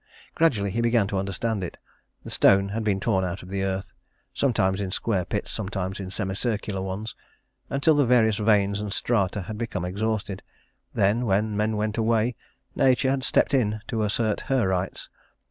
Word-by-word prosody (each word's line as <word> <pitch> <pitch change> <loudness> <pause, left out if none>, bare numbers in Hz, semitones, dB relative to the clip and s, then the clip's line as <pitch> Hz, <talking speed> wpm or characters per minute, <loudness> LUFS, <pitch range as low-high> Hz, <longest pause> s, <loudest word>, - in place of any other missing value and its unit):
Gradually 105 -12 +2
he 115 - -1
began 115 -2 +3
to 100 - -1
understand 100 +2 -2
it. 90 - -6 0.5
The - - -7
stone 100 0 +4
had 110 +2 -3
been 100 -2 +1
torn 95 -2 +1
out 90 0 -4
of 90 - -11
the 95 0 -2
earth, 95 0 -3 0.4
sometimes 100 -7 +1
in 95 - -2
square 95 -1 -1
pits, 100 +2 -3
sometimes 95 -2 -3
in 95 -2 -5
semi 95 0 -3
circular 105 -2 -2
ones, 100 +3 -4 0.6
until 140 +4 +3
the 145 -3 +3
various 110 -4 +4
veins 105 -2 +2
and 105 -1 -4
strata 100 -2 0
had 105 +4 -7
become 110 -7 -3
exhausted. 100 0 -2 0.5
Then, 110 +5 +1
when 105 +2 +1
men 105 +1 0
went 105 +1 -1
away, 115 +1 +2 0.4
Nature 130 0 +3
had 135 -1 -1
stepped 145 - +3
in 110 -5 +1
to 110 - -1
assert 105 0 0
her 130 -7 +1
rights. 95 0 -2
105 Hz, 180 wpm, -25 LUFS, 95-115 Hz, 0.6 s, stone